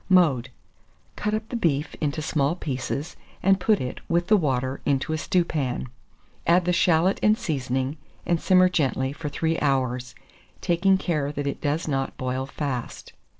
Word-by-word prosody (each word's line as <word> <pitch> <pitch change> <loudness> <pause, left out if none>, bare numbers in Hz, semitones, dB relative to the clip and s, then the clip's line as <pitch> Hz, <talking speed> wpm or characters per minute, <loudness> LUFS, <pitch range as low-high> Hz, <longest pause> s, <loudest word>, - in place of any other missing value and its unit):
Mode. 150 -10 +4 0.7
Cut 210 0 -1
up 215 0 -4
the - - -4
beef 155 -9 0
into 150 0 -1
small 150 0 +1
pieces, 145 +1 -4 0.3
and 195 0 +4
put 215 +2 +3
it, 125 0 -4
with 175 +1 +1
the 215 - +7
water, 130 -6 0
into 140 +2 0
a - - 0
stewpan. 150 -9 -1 0.6
Add 175 +1 +4
the 180 - +2
shalot 175 +2 +3
and 215 +1 +4
seasoning, 135 - -2 0.3
and 170 -2 +1
simmer 185 -1 +5
gently 135 -6 0
for 150 0 -5
3 165 +3 -1
hours, 130 -3 0 0.4
taking 190 +3 +3
care 150 -6 -1
that 145 -1 -4
it 140 - -3
does 150 +3 -1
not 135 -2 -2
boil 130 +1 -2
fast. 135 -4 -5
150 Hz, 160 wpm, -25 LUFS, 135-175 Hz, 0.7 s, the